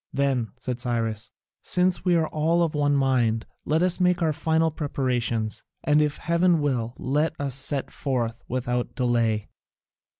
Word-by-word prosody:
"Then," 135 -5 0
said 125 -1 -4
Cyrus, 115 -2 -2 0.3
"since 180 0 +2
we 180 -2 +3
are 160 -1 +2
all 165 +3 +1
of 165 - -1
one 145 -1 +2
mind, 125 -5 +1 0.2
let 160 +3 +2
us 180 0 +1
make 180 -1 +2
our 155 -1 +2
final 160 +2 +1
preparations, 125 -7 -2 0.2
and, 150 0 +4
if 150 -1 0
heaven 170 +1 +2
will, 125 -5 -1
let 150 +4 -1
us 140 -2 -2
set 140 +1 +1
forth 120 -4 -2
without 125 -1 -2
delay." 115 -4 0
140 Hz, 155 wpm, -25 LUFS, 120-160 Hz, 0.3 s, and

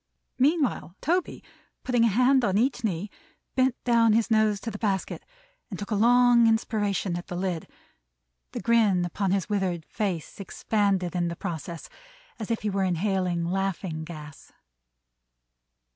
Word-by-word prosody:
Meanwhile 275 - +1
Toby, 350 +4 -1 0.4
putting 245 -2 +2
a - - +5
hand 250 +5 +3
on 195 -3 +1
each 245 +1 +1
knee, 200 -1 -2 0.4
bent 260 -1 +2
down 230 -2 +4
his 225 +1 +1
nose 215 -2 +3
to 230 - -4
the 210 - -7
basket, 195 -4 -2 0.5
and 195 - -6
took 205 +3 -7
a - - +2
long 240 +2 +5
inspiration 205 -4 0
at 175 - -8
the 175 - -5
lid; 180 -2 -3 0.8
the - - -5
grin 215 -6 +3
upon 195 +3 -2
his 190 -2 0
withered 190 -6 -1
face 195 -7 -4
expanded 195 -3 -1
in 175 -1 0
the 170 - -4
process, 170 -2 -6 0.5
as 215 - -5
if 230 -2 -2
he 215 - 0
were 195 0 0
inhaling 180 -1 0
laughing 185 -3 -2
gas. 155 -2 -11
200 Hz, 150 wpm, -26 LUFS, 180-230 Hz, 0.8 s, a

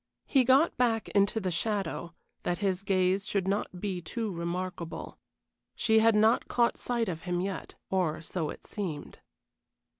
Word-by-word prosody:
He 270 -3 +4
got 265 +7 +4
back 230 -3 +1
into 200 +2 +2
the 190 -3 -2
shadow, 180 -2 -2 0.3
that 175 - -1
his 190 -2 0
gaze 190 0 +1
should 195 -2 0
not 195 -2 -1
be 185 -2 -3
too 220 +5 -3
remarkable. 170 0 -4 0.6
She 220 -1 +4
had 225 0 +5
not 220 +2 +4
caught 235 -1 +2
sight 235 -2 -1
of 165 -3 -3
him 180 -1 -1
yet, 190 +1 -4 0.2
or 180 -5 +1
so 160 -1 -3
it - - -9
seemed. 175 -9 -5
195 Hz, 155 wpm, -30 LUFS, 180-220 Hz, 0.6 s, had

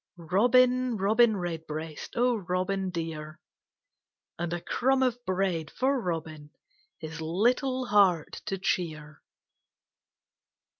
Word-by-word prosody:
Robin, 245 +7 +3
Robin 215 +3 +3
Redbreast, 160 -3 -5
O 245 +1 +3
Robin 190 0 -2
dear, 160 -3 -5 1.0
And 170 -1 -2
a 175 - -2
crumb 265 +8 +1
of 245 -1 -1
bread 185 -4 -1
for 265 0 0
Robin, 160 -5 -4 0.5
His 160 0 -7
little 250 - +1
heart 195 -8 +2
to 195 - -2
cheer. 155 -5 -3
185 Hz, 100 wpm, -28 LUFS, 160-240 Hz, 1.0 s, Robin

